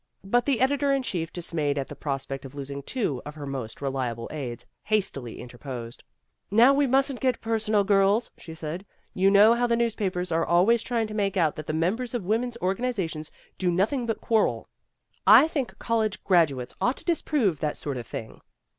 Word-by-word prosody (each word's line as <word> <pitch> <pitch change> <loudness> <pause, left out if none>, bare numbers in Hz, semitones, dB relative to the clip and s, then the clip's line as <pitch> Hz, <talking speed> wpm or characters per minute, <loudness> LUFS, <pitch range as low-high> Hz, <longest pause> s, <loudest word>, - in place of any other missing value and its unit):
But 240 +6 +1
the 265 -4 +1
editor 280 +1 +2
in 275 -1 +1
chief, 170 -8 -3
dismayed 155 -4 -2
at 135 - -1
the - - -8
prospect 135 -1 -4
of 135 0 -10
losing 140 0 -6
two 150 - -2
af 150 +1 -8
her 145 -2 -7
most 135 -2 -6
reliable 125 -4 -2
aides, 130 -6 -5 0.2
hastily 185 - -1
interposed. 120 -1 -8 0.5
"Now 235 +6 +6
we 280 0 +3
mustn't 270 0 +2
get 255 -1 +1
personal, 220 -2 +1
girls," 200 +3 +3
she 160 -2 -10
said. 160 +3 -5 0.3
"You 190 +1 +3
know 205 +3 +7
how 240 +1 +1
the 235 - +2
newspapers 200 -6 -1
are 165 +1 +2
always 195 +7 +4
trying 230 -2 -1
to 215 - -7
make 200 -2 0
out 160 -4 +2
that 155 - -7
the - - -2
members 215 +11 -1
of 220 -7 -3
women's 235 +4 0
organizations 190 -6 -2 0.3
do 185 - +1
nothing 220 +8 +1
but 225 - -2
quarrel. 225 -2 +1 0.6
I 310 - +9
think 280 -6 -3
college 220 -3 -1
graduates 145 -10 +2
ought 250 - +1
to - - -11
disprove 285 - +1
that 150 -1 -2
sort 140 -3 -4
of 120 -2 -7
thing." 110 - -7
195 Hz, 190 wpm, -26 LUFS, 145-235 Hz, 0.6 s, I